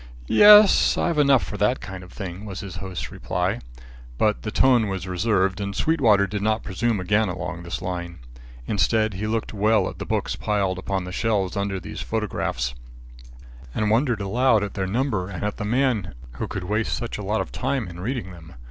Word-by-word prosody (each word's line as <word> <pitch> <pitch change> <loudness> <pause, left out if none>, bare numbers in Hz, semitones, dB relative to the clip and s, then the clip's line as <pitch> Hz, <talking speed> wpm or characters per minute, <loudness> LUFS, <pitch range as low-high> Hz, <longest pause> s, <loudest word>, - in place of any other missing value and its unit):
"Yes, 210 - +7
I've 170 -3 +1
enough 140 -3 +5
for 105 - -6
that 105 +6 +1
kind 95 -1 -8
of 90 - -13
thing," 95 -1 -7
was 100 -2 -6
his 100 -3 -7
host's 95 -2 -5
reply. - - -2 0.6
But 105 +5 +1
the 110 - -4
tone 120 -1 +3
was 95 -2 -4
reserved, 95 +1 +1
and 100 0 -4
Sweetwater 115 -11 +3
did 100 +1 -4
not 110 +1 0
presume 110 +2 -1
again 105 +3 +1
along 90 -1 -5
this 85 +1 -5
line. 85 -1 -4 0.5
Instead, 110 - +1
he 100 +3 -3
looked 110 0 -2
well 105 -1 +2
at - - -8
the - - -4
books - - -1
piled 100 -3 -1
upon 95 0 -2
the 90 - -7
shelves 100 -3 0
under 100 -1 -2
these - - -7
photographs, 95 - -2 1.0
and 105 -1 +1
wondered 120 -2 +2
aloud 110 +2 +2
at 100 - -4
their 95 -2 -2
number 105 -3 -1
and 95 -1 -6
at 105 0 -2
the 105 - -4
man 115 - 0 0.2
who - - -5
could 95 - -5
waste 105 +4 -1
such 120 -3 -5
a - - -5
lot 105 +3 0
of - - -4
time 130 -4 -2
in 85 -1 -9
reading 110 -1 -3
them. 85 -3 -13
105 Hz, 195 wpm, -24 LUFS, 95-115 Hz, 1.0 s, Yes